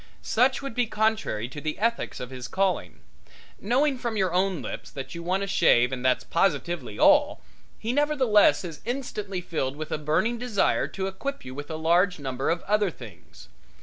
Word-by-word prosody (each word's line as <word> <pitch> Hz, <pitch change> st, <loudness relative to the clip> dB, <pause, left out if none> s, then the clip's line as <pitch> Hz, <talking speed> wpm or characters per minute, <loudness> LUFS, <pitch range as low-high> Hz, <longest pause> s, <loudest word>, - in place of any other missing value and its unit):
Such 260 Hz, +4 st, +2 dB
would 275 Hz, -, -5 dB
be 245 Hz, 0 st, +1 dB
contrary 215 Hz, -, 0 dB
to 145 Hz, +2 st, -8 dB
the 155 Hz, 0 st, -3 dB
ethics 230 Hz, +3 st, -1 dB
of 125 Hz, +1 st, -7 dB
his 125 Hz, -2 st, -6 dB
calling. 190 Hz, +4 st, -1 dB, 0.6 s
Knowing 260 Hz, +5 st, +1 dB
from 235 Hz, -3 st, -3 dB
your 190 Hz, -3 st, +1 dB
own 185 Hz, -1 st, +1 dB
lips -, -, -6 dB
that 135 Hz, -2 st, -7 dB
you 170 Hz, -, -6 dB
want 185 Hz, +3 st, 0 dB
a -, -, -3 dB
shave 125 Hz, -10 st, +4 dB
and 130 Hz, -1 st, -4 dB
that's 130 Hz, -1 st, +2 dB
positively 170 Hz, -1 st, -1 dB
all, 295 Hz, 0 st, +4 dB, 0.4 s
he 230 Hz, +2 st, -3 dB
nevertheless 265 Hz, -10 st, +4 dB
is 165 Hz, -3 st, -8 dB
instantly 210 Hz, -6 st, -4 dB
filled 140 Hz, -6 st, -3 dB
with 155 Hz, +1 st, -6 dB
a -, -, -1 dB
burning 175 Hz, +11 st, 0 dB
desire 240 Hz, -5 st, +1 dB
to 190 Hz, -, -4 dB
equip 235 Hz, +9 st, -5 dB
you 130 Hz, -, -7 dB
with 145 Hz, +2 st, -7 dB
a 160 Hz, -, -4 dB
large 175 Hz, +4 st, +2 dB
number 135 Hz, -2 st, -3 dB
of 170 Hz, +1 st, 0 dB
other 210 Hz, -1 st, +2 dB
things. 105 Hz, -, -13 dB
190 Hz, 185 wpm, -26 LUFS, 150-230 Hz, 0.6 s, shave